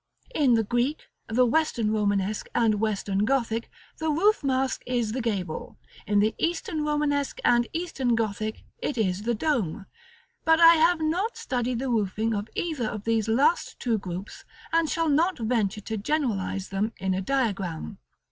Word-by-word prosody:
] - - -30
In 250 -4 +5
the 225 - +2
Greek, 245 +7 -1 0.2
the 245 +3 +3
Western 240 -5 +1
Romanesque, 205 -1 0
and 225 -3 +3
Western 205 -2 0
Gothic, 230 -2 0 0.3
the 315 - -1
roof 380 +6 +3
mask 265 -1 0
is 240 -3 0
the 255 +3 -2
gable: 195 -8 -3 0.3
in 205 +1 +2
the 215 +1 +2
Eastern 330 -2 -1
Romanesque, 295 -2 0
and 240 -1 +4
Eastern 275 -8 -1
Gothic, 215 -1 -2 0.2
it 290 - -3
is 190 -3 0
the 235 +2 0
dome: 220 - -1 0.6
but 320 0 +4
I 335 0 +9
have 330 +1 +3
not 360 +9 0
studied 245 -1 -2
the 260 +2 -2
roofing 220 0 0
of 205 +1 -3
either 305 -9 -1
of 215 -2 -5
these 225 -1 +1
last 265 +9 +2
two 230 -4 0
groups, 185 +1 -7 0.3
and 330 -1 +3
shall 330 +1 0
not 325 +5 +2
venture 220 -3 0
to 220 +2 -4
generalize 205 -7 -1
them 205 +3 -1
in 190 0 -1
a 185 - -1
diagram. 195 - -2
235 Hz, 165 wpm, -26 LUFS, 210-295 Hz, 0.6 s, I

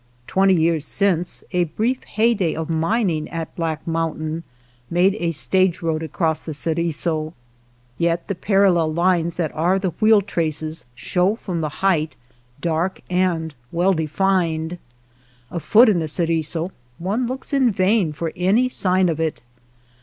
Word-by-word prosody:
Twenty 190 +4 +3
years 165 -2 +2
since, 180 -3 0
a 180 -1 +2
brief 225 +11 -1
hey 230 +2 +2
day 185 -7 -1
of 160 +1 -3
mining 165 -1 0
at 165 -1 -5
Black 165 -2 -3
Mountain 160 -1 -2 0.5
made 180 +3 +3
a 170 - 0
stage 185 +3 +1
road 160 -1 0
across 160 -1 -1
the 155 - -5
Ceriso, 160 0 -1 0.7
yet 170 0 0
the 200 - -1
par 195 +2 +1
allel 170 -5 +3
lines 170 -1 +2
that 165 -3 -1
are 175 +5 +2
the 190 -2 -1
wheel 215 -1 +5
traces 160 -6 -3
show 180 - +1
from 180 -7 -4
the 155 - -1 0.2
height 160 -5 +2 0.5
dark 170 +2 -1
and 175 -4 0 0.2
well 180 +3 +2
defined. 165 0 0 0.7
Afoot 215 +8 +5
in 200 -5 +3
the 160 - -2
Ceriso 165 +1 -1 0.3
one 210 +8 -1
looks 265 +3 -6
in 265 -3 +4
vain 190 -2 +2
for 160 +2 -4
any 200 +8 +3
sign 185 -6 +2
of 160 -2 -1
it. 160 -6 -2
170 Hz, 150 wpm, -21 LUFS, 160-190 Hz, 0.7 s, wheel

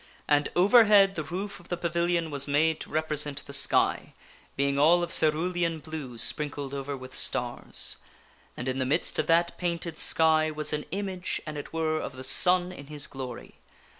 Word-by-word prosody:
And 145 -1 +2
overhead 205 0 +6
the 160 - -4
roof 190 +7 -5
of 175 - -17
the 175 - -3
pavilion 170 -1 0
was 140 0 -1
made 155 +3 +2
to - - -6
represent 150 -2 0
the 140 - -8
sky, 135 - +2 0.4
being 140 0 0
all 170 +4 +5
of 175 - -4
cerulean 165 +2 +1
blue 150 -6 -7
sprinkled 145 +1 -2
over 140 0 -4
with 130 0 -11
stars. 120 -1 -3 0.6
And 120 - -5
in 130 +1 -1
the 130 - 0
midst 155 +6 0
of - - 0
that 170 +1 +2
painted 170 -2 -3
sky 160 -1 +3
was 150 -1 -1
an 150 0 -2
image, 190 -2 -3
an 155 -1 -6
it 145 - -7
were, 160 -1 -1
of - - -5
the 130 - -8
sun 180 +6 +2
in 140 -6 -11
his 150 -1 -1
glory. 130 -3 -8
155 Hz, 180 wpm, -27 LUFS, 140-175 Hz, 0.6 s, overhead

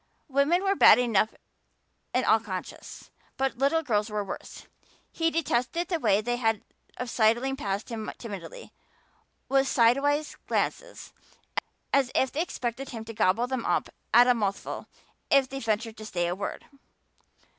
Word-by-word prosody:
Women 285 +7 +2
were 390 0 +3
bad 370 - +8
enough 225 -3 +2 0.8
in 255 - +1
all 225 - +5
conscience, 190 -5 -8 0.3
but 265 -2 -1
little 285 +4 +2
girls 215 -5 0
were 210 -1 -2
worse. 195 - -8 0.5
He 330 0 +1
detested 325 +1 -1
the 340 -3 0
way 210 -6 +3
they 240 +2 -1
had 225 -3 0 0.3
of 250 - -4
sidling 240 +4 +2
past 200 -6 -3
him 220 -2 -4
timidly, 235 - -8 0.7
with 270 0 +3
sidewise 275 +6 +2
glances, - - -2 0.8
as 270 -2 +3
if 265 - +2
they 300 - -1
expected 260 -5 -4
him 225 -2 -7
to 225 - -7
gobble 210 +3 +2
them 255 -2 -3
up - - 0 0.2
at 245 - +8
a 250 - +5
mouthful 205 -4 -3 0.4
if 275 -1 +5
they 270 +1 -6
ventured 225 -1 -2
to 215 - -8
say 175 -4 -1
a 175 - 0
word. 195 +2 -5
245 Hz, 155 wpm, -27 LUFS, 220-275 Hz, 0.8 s, bad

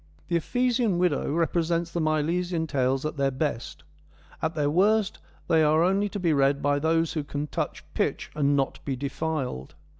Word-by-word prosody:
The 170 - +1
Ephesian 240 +2 +1
Widow 175 -6 +1
represents 170 +1 0
the 170 - -1
Milesian 160 +2 0
Tales 135 -2 0
at 155 - -3
their 140 -1 +2
best; 135 -3 -3 0.6
at 160 0 -1
their 150 -2 +1
worst 200 +6 +2 0.3
they 165 -2 +4
are 155 +1 +4
only 195 +3 +2
to 205 - -5
be 170 -4 +2
read 140 0 +3
by 145 0 +1
those 165 +2 +1
who 155 -3 -2
can 145 +1 -4
touch - - -4
pitch - - -1
and 145 -1 +2
not 135 -1 -1
be 135 - -2
defiled. 140 - -3
160 Hz, 175 wpm, -26 LUFS, 145-175 Hz, 0.6 s, they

